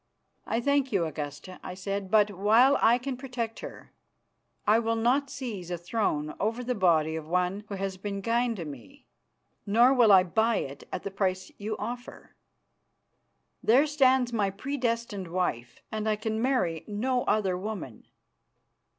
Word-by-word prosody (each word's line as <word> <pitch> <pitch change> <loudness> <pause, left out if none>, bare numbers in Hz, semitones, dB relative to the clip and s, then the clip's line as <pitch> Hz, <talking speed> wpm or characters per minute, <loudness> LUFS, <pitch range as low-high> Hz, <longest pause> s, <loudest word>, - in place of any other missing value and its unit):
"I 225 - 0
thank 280 +1 +1
you, 190 -5 +1
Augusta," 150 +3 -6
I 185 - -7
said, 195 +1 -4
"but, 210 -1 +4
while 220 +8 +4
I 235 +2 +5
can 255 +1 -4
protect 245 -4 -4
her, - - -10 0.7
I 215 +2 +5
will 230 0 0
not 255 +5 +1
seize 220 -11 -6
a 175 - -2
throne 165 -5 -1
over 225 +4 -1
the 250 +1 -1
body 165 -6 +2
of 160 -1 -6
one 180 +4 0
who 200 - -4
has 195 -1 -3
been 200 0 -5
kind 235 +1 +1
to 175 -5 -6
me, 140 -7 -11 0.6
nor 235 +6 +5
will 240 -5 +5
I 190 -2 +8
buy 220 +6 +1
it 140 -4 -4
at 180 - -4
the 200 - -4
price 190 +4 -1
you 215 +1 -3
offer. 245 +4 -7 1.3
There 255 +6 +5
stands 260 -4 +3
my 205 -3 +1
predestined 230 -3 -3
wife, 165 -10 -3
and 220 0 -2
I 215 - +2
can 220 +1 -3
marry 235 - 0
no 245 +4 0
other 195 -4 +1
woman." 185 - -6
210 Hz, 160 wpm, -28 LUFS, 185-240 Hz, 1.3 s, I